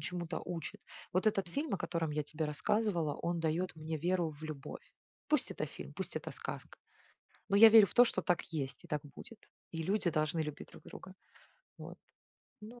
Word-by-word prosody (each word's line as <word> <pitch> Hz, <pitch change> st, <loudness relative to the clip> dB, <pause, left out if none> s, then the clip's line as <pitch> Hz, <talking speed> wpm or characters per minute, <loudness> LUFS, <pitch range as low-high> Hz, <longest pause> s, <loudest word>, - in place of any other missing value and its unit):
чему-то 175 Hz, -2 st, -4 dB
учит. 170 Hz, -3 st, -5 dB, 0.3 s
Вот 185 Hz, +4 st, +1 dB
этот 195 Hz, -4 st, +2 dB
фильм, 285 Hz, -, -2 dB
о -, -, 0 dB
котором 165 Hz, -4 st, -2 dB
я 150 Hz, 0 st, 0 dB
тебе 155 Hz, +2 st, -3 dB
рассказывала, 165 Hz, +1 st, 0 dB
он 170 Hz, 0 st, -2 dB
дает 165 Hz, +3 st, 0 dB
мне 160 Hz, +1 st, -4 dB
веру 175 Hz, +1 st, +1 dB
в 150 Hz, 0 st, -14 dB
любовь. 155 Hz, -, -8 dB, 0.3 s
Пусть 300 Hz, -3 st, +2 dB
это -, -, -3 dB
фильм, -, -, -9 dB
пусть -, -, -5 dB
это -, -, -4 dB
сказка. -, -, -7 dB, 0.7 s
Но 200 Hz, -, +3 dB
я 225 Hz, +2 st, +11 dB
верю 220 Hz, -2 st, +9 dB
в -, -, -12 dB
то, 245 Hz, -, +9 dB
что 210 Hz, -, -1 dB
так 180 Hz, -1 st, +1 dB
есть, 140 Hz, -4 st, -4 dB
и -, -, -13 dB
так 150 Hz, -1 st, -1 dB
будет. 230 Hz, -, -10 dB, 0.3 s
И 165 Hz, -1 st, -3 dB
люди 190 Hz, 0 st, +1 dB
должны 155 Hz, +1 st, 0 dB
любить 150 Hz, -2 st, -4 dB
друг -, -, -14 dB
друга. 185 Hz, -, -10 dB, 0.6 s
Вот. -, -, -9 dB, 0.6 s
Ну 235 Hz, +3 st, -10 dB
170 Hz, 190 wpm, -34 LUFS, 155-200 Hz, 0.7 s, я